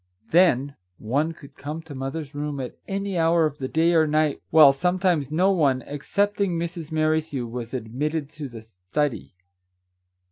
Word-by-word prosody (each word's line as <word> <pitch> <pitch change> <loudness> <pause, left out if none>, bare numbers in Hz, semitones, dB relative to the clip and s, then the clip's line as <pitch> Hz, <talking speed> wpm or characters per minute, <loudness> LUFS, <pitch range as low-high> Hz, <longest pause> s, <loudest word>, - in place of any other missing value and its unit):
Then, 145 -6 +3 0.2
one 140 +9 0
could 145 -4 -14
come 150 +3 -6
to 160 -2 -10
mother's 140 +2 -5
room 145 -1 -4
at 125 -2 -5
any 195 -2 -2
hour 165 0 +4
of 150 -1 -3
the 130 - -2
day 165 +4 +2
or 160 -2 +4
night, 155 -1 +1
while 150 -4 +8
sometimes 180 -2 +1
no 180 +6 +3
one, 140 -8 +2
excepting 200 +6 -1
Mrs. 165 -1 -5
Merrithew, 155 -4 0
was 120 0 -6
admitted 140 +6 -3
to 150 -3 -7
the 115 -2 -10
study. 110 +5 -3
150 Hz, 155 wpm, -24 LUFS, 135-165 Hz, 0.2 s, while